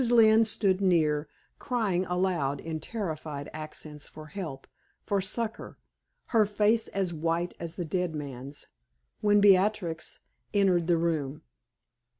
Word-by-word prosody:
Lynne 225 -1 +6
stood 200 -3 +1
near, 155 -5 +2 0.3
crying 200 -7 0
aloud 175 -6 0
in 160 +1 -4
terrified 155 -7 -4
accents 155 -1 -7
for 155 - -11
help, 155 -5 -6 0.4
for 200 -2 0
succor, 220 +4 -4 0.6
her 225 -2 +6
face 210 +2 +2
as 190 -3 -1
white 165 +2 -1
as 170 -1 -6
the 175 - -3
dead 175 0 -1
man's, 140 -1 -7 0.5
when 205 0 +4
Beatrix 195 -4 +3 0.4
entered 185 -4 +3
the 175 -1 +4
room. 155 -3 -1
175 Hz, 125 wpm, -28 LUFS, 155-200 Hz, 0.6 s, Lynne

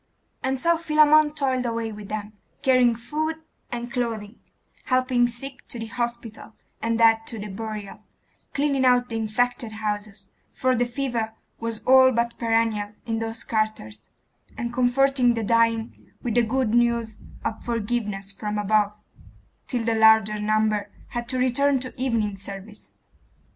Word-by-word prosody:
And 265 0 -1
so 335 +4 +3
Philammon 305 -1 +5
toiled 260 -4 0
away 230 -2 -2
with 210 -1 -9
them, 215 0 -5 0.3
carrying 250 -3 +4
food 305 +7 -3 0.4
and 240 +1 -5
clothing, 230 -3 -3 0.5
helping 255 -1 +2
sick 260 +3 -7
to - - -7
the 225 - -4
hospital, 235 0 -5 0.3
and 230 0 0
dead 225 -1 +4
to 230 - -4
the 210 0 -6
burial; 210 -1 -6 0.6
cleaning 280 -2 +1
out 250 -1 +4
the 225 - -3
infected 225 +1 -1
houses 210 -2 -4 0.2
for 255 0 +1
the 245 0 +1
fever 240 -4 -2 0.2
was 230 -1 -4
all 260 0 +7
but 235 0 -1
perennial 225 -3 +1
in 225 -1 -1
those 225 0 -3
quarters 215 - -3 0.5
and 235 +1 -3
comforting 255 0 +3
the 225 - -2
dying 230 0 +1
with 240 - -1
the 240 - +4
good 235 0 0
news 235 -2 +1 0.3
of 220 - -3
forgiveness 210 -4 -2
from 210 +1 -4
above; 210 0 +2 0.7
till 245 -3 -2
the 230 0 +1
larger 220 -1 +5
number 215 -1 +1 0.2
had 240 -1 -4
to 255 - -1
return 265 +2 +2
to 255 0 -5
evening 225 -6 0
service. 200 +2 -9
230 Hz, 150 wpm, -24 LUFS, 215-250 Hz, 0.7 s, all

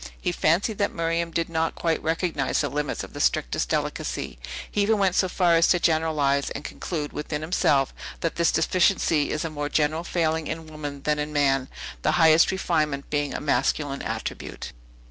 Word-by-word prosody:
He 180 - -1
fancied 175 +6 +1
that 200 - +1
Miriam 165 0 0
did 165 0 -1
not 165 0 -1
quite 165 -1 0
recognize 165 +1 0
the 145 - -1
limits 145 +1 -2
of - - -10
the - - -7
strictest - - +1
delicacy; - - -3 0.3
he 205 - +1
even 215 +2 +3
went 195 -3 +2
so 185 0 +2
far 180 -2 +3
as 165 0 +5
to 175 - +3
generalize, 155 -4 +1
and - - -6
conclude 150 -3 -4
within 150 0 -4
himself, 145 -5 +2 0.3
that 165 - -1
this 170 -1 +3
deficiency 165 -2 +2
is 155 - -2
a 165 - -3
more 145 -1 -3
general 155 +2 +1
failing 160 -2 0
in 160 0 -5
woman 145 -3 -7
than 150 0 +1
in 150 +1 -3
man, 135 -3 +2 0.3
the - - +1
highest 160 -1 +6
refinement 155 -7 -1
being 145 -1 -1
a - - -2
masculine 145 -1 0
attribute. - - -5
160 Hz, 185 wpm, -25 LUFS, 145-170 Hz, 0.3 s, highest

